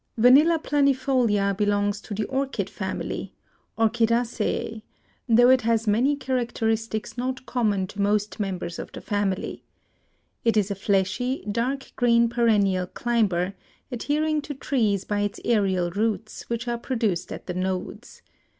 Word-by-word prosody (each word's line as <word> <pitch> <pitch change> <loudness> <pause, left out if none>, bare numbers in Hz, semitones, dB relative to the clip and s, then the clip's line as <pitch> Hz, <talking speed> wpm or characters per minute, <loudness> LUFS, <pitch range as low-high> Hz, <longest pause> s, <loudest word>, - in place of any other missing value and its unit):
Vanilla 280 +8 +6
planifolia 260 -9 +2
belongs 205 0 0
to 205 - -6
the 210 +1 -1
Orchid 270 +2 -2
family - - -4 0.4
(Orchidaceae), 230 0 0 0.5
though 240 +2 +6
it 260 -1 +5
has 225 0 +1
many 240 +7 +3
characteristics 235 -4 -2
not 255 +1 -3
common 210 -6 0
to 200 +2 -6
most 205 +1 0
members 185 -4 -3
of - - -7
the - - -6
family. 205 -3 -2 0.8
It 230 -1 +2
is 205 -1 +2
a - - +1
fleshy, 200 +7 0
dark 255 +5 -2
green 235 -1 +4
perennial 205 -6 +2
climber, 200 -6 0 0.4
adhering 300 +5 0
to 290 0 -7
trees 220 -8 0
by 205 -1 -1
its 205 0 -2
aerial 190 -6 +1
roots, 215 +2 -2
which 235 +1 -3
are 235 0 -1
produced 220 -9 -1
at - - -7
the 180 - -4
nodes. 185 +5 -4
225 Hz, 135 wpm, -25 LUFS, 205-245 Hz, 0.8 s, Vanilla